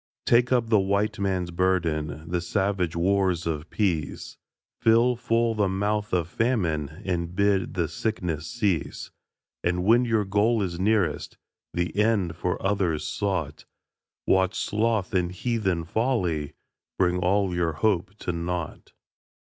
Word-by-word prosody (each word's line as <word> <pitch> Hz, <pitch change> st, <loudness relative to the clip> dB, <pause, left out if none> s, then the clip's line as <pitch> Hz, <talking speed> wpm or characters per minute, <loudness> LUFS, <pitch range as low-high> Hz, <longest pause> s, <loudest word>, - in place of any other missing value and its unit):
Take 120 Hz, +1 st, +4 dB
up 120 Hz, -3 st, +2 dB
the 110 Hz, -, +6 dB
White 100 Hz, +2 st, 0 dB
Man's 95 Hz, -3 st, -1 dB
burden 80 Hz, -4 st, 0 dB
The 90 Hz, +1 st, -1 dB
savage 95 Hz, -2 st, -1 dB
wars 95 Hz, -1 st, +1 dB
of 80 Hz, -1 st, -3 dB
peace 85 Hz, -9 st, -2 dB, 0.4 s
Fill 115 Hz, +2 st, +4 dB
full 115 Hz, -1 st, +1 dB
the 105 Hz, -3 st, +1 dB
mouth 105 Hz, +2 st, -1 dB
of 85 Hz, -3 st, +1 dB
Famine 85 Hz, -, -1 dB
And 85 Hz, -2 st, -2 dB
bid 100 Hz, -1 st, +1 dB
the 85 Hz, -3 st, 0 dB
sickness 85 Hz, -3 st, -3 dB
cease; 100 Hz, -, -2 dB, 0.5 s
And 90 Hz, +1 st, 0 dB
when 120 Hz, +5 st, +4 dB
your 110 Hz, -3 st, +1 dB
goal 105 Hz, +3 st, +2 dB
is 85 Hz, -2 st, -4 dB
nearest 95 Hz, -6 st, 0 dB, 0.4 s
The 85 Hz, +1 st, -1 dB
end 105 Hz, -5 st, +1 dB
for 90 Hz, +1 st, -2 dB
others 95 Hz, -6 st, 0 dB
sought, 90 Hz, -7 st, -2 dB, 0.6 s
Watch 95 Hz, 0 st, +2 dB
Sloth 110 Hz, -2 st, 0 dB
and 90 Hz, -2 st, +1 dB
heathen 95 Hz, -4 st, -1 dB
Folly 90 Hz, -, -1 dB, 0.4 s
Bring 90 Hz, -1 st, +2 dB
all 95 Hz, +1 st, +1 dB
your 85 Hz, -2 st, 0 dB
hope 100 Hz, +2 st, 0 dB
to -, -, -1 dB
naught. 85 Hz, -1 st, -4 dB
95 Hz, 135 wpm, -26 LUFS, 85-105 Hz, 0.6 s, the